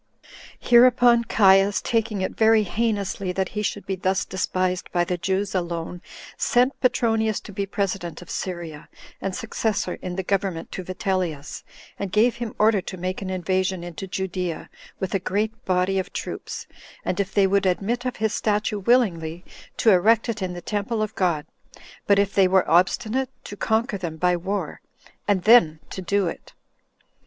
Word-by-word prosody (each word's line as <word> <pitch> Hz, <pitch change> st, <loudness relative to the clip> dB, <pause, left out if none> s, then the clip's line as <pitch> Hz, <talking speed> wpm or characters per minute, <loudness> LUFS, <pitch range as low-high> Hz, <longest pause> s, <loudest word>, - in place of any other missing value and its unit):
2. -, -, -8 dB
Hereupon 240 Hz, -1 st, +6 dB
Caius, 195 Hz, -2 st, +4 dB
taking 225 Hz, -5 st, -1 dB
it 185 Hz, -, -1 dB
very 220 Hz, -1 st, +4 dB
heinously 200 Hz, -2 st, -1 dB
that 190 Hz, +1 st, -1 dB
he 210 Hz, -, -3 dB
should 205 Hz, -1 st, -3 dB
be 195 Hz, -, -2 dB
thus 190 Hz, +1 st, 0 dB
despised 185 Hz, -1 st, -2 dB
by 175 Hz, -1 st, +2 dB
the 180 Hz, +1 st, -1 dB
Jews 190 Hz, +3 st, -1 dB
alone, 170 Hz, -1 st, -3 dB, 0.4 s
sent 250 Hz, +3 st, +2 dB
Petronius 225 Hz, -4 st, +2 dB
to -, -, -11 dB
be 200 Hz, 0 st, -3 dB
president 195 Hz, -4 st, -3 dB
of 180 Hz, -, -13 dB
Syria, 170 Hz, -5 st, -5 dB, 0.3 s
and 195 Hz, -1 st, -3 dB
successor 215 Hz, -5 st, -2 dB
in 180 Hz, -1 st, -5 dB
the 190 Hz, -, -2 dB
government 190 Hz, -3 st, -2 dB
to 185 Hz, -, -5 dB
Vitellius, 180 Hz, -5 st, -3 dB, 0.4 s
and 200 Hz, -2 st, -3 dB
gave 230 Hz, +4 st, +3 dB
him 235 Hz, -2 st, -5 dB
order 215 Hz, -2 st, +4 dB
to 185 Hz, -, -7 dB
make 185 Hz, +2 st, -3 dB
an 190 Hz, -, -4 dB
invasion 185 Hz, 0 st, -1 dB
into 175 Hz, +2 st, -7 dB
Judea, 185 Hz, -3 st, -4 dB, 0.3 s
with 190 Hz, -, -3 dB
a 195 Hz, -, +2 dB
great 215 Hz, +6 st, -2 dB
body 185 Hz, +1 st, +1 dB
of 190 Hz, -, -4 dB
troops; -, -, -6 dB, 0.4 s
and 185 Hz, -, -1 dB
if 195 Hz, -1 st, -1 dB
they 200 Hz, -1 st, +3 dB
would 195 Hz, 0 st, +2 dB
admit 210 Hz, +7 st, 0 dB
of 255 Hz, -1 st, -3 dB
his 220 Hz, 0 st, -1 dB
statue 210 Hz, 0 st, 0 dB
willingly, 180 Hz, -7 st, +1 dB, 0.3 s
to 225 Hz, -, +4 dB
erect 215 Hz, +6 st, +4 dB
it 225 Hz, -3 st, -3 dB
in 185 Hz, -1 st, -2 dB
the 175 Hz, -, -7 dB
temple 215 Hz, +3 st, -2 dB
of 215 Hz, 0 st, -4 dB
God; 170 Hz, -6 st, 0 dB, 0.6 s
but 200 Hz, -, +5 dB
if 200 Hz, -1 st, +1 dB
they 195 Hz, -2 st, +5 dB
were 190 Hz, 0 st, +3 dB
obstinate, 215 Hz, +9 st, +2 dB
to 205 Hz, -, -8 dB
conquer 220 Hz, 0 st, 0 dB
them 165 Hz, -3 st, -5 dB
by 180 Hz, +2 st, +2 dB
war, 190 Hz, +4 st, -3 dB, 0.5 s
and 195 Hz, -3 st, +2 dB
then 190 Hz, -9 st, +6 dB
to 190 Hz, -, -5 dB
do 200 Hz, +2 st, +1 dB
it. -, -, -7 dB
195 Hz, 175 wpm, -24 LUFS, 180-215 Hz, 0.6 s, Hereupon